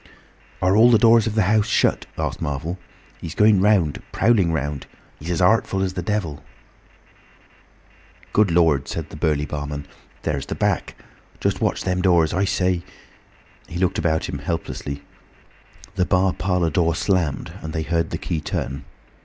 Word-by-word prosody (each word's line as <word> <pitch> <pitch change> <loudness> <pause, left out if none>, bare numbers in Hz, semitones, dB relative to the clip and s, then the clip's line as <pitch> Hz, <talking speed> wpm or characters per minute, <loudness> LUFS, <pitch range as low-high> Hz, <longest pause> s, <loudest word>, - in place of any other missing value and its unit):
"Are 95 +2 +3
all 115 +3 +7
the 115 - +6
doors 115 0 +5
of 110 - -3
the 110 - +3
house 105 +2 +2
shut?" - - +1
asked - - -3
Marvel. 75 +6 -3 0.4
"He's 80 -1 -7
going 105 -2 +5
round—prowling 100 +1 +2
round. 75 -2 -3 0.3
He's 80 - -7
as 90 +1 +1
artful 95 -1 +2
as 95 -1 -2
the 90 - -3
devil." 85 -7 -3 1.9
"Good 105 -2 +4
Lord!" 80 -5 +3
said 80 -2 -5
the - - -9
burly 75 -2 0
barman. 75 -1 -5 0.4
"There's 70 -4 -2
the - - -3
back! - - -1 0.4
Just - - -1
watch - - 0
them 90 0 0
doors! 85 -4 +3
I 95 +3 +1
say—!" 90 -2 0 0.9
He 85 - -6
looked 95 +3 0
about 80 -4 0
him - - -5
helplessly. 70 0 -4 0.9
The 95 -3 +1
bar 95 0 +2
parlour 90 -3 0
door 85 +1 +1
slammed 85 -7 -1
and 80 - -6
they 80 0 -2
heard 85 +1 0
the - - -3
key 80 - -3
turn. 70 -2 -4
85 Hz, 160 wpm, -22 LUFS, 80-95 Hz, 1.9 s, all